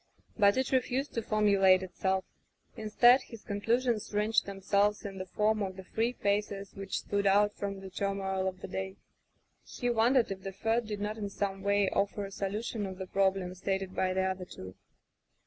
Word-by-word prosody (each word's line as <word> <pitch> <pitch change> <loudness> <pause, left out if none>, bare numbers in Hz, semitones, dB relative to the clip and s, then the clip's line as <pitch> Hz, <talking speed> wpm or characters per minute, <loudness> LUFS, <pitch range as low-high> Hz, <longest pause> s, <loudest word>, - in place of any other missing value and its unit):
But 200 0 +4
it 260 0 0
refused 260 +2 0
to 230 - -1
formulate 200 -4 +4
itself. 190 +1 -1 0.5
Instead, 240 +3 +5
his 230 -3 -12
conclusions 230 +2 0
ranged 210 +1 +2
them 195 -1 -6
selves 205 +2 +2
in 195 -1 -6
the 185 - -5
form 215 +3 +1
of 190 -2 -2
the 190 - -9
three 225 +5 0
faces 200 -2 -1
which 195 -1 -4
stood 200 0 0
out 205 +1 +4
from 200 -1 -5
the 190 -1 -9
turmoil 190 -1 -1
of 185 0 -4
the - - -5
day. 190 +1 -4 0.7
He 245 -1 -2
wondered 235 0 +3
if 190 0 -5
the 195 0 -6
third 225 +3 0
did 210 -1 -4
not 210 +2 -3
in 205 -1 -3
some 195 -1 -3
way 200 0 +2
offer 200 0 -1
a 195 - -8
solution 205 +2 -3
of 190 -1 -7
the 190 - -5
problem 190 -1 +1
stated 190 0 -2
by 185 0 +1
the 190 - +2
other 190 -1 -2
two. 95 - -10
200 Hz, 190 wpm, -31 LUFS, 190-215 Hz, 0.7 s, Instead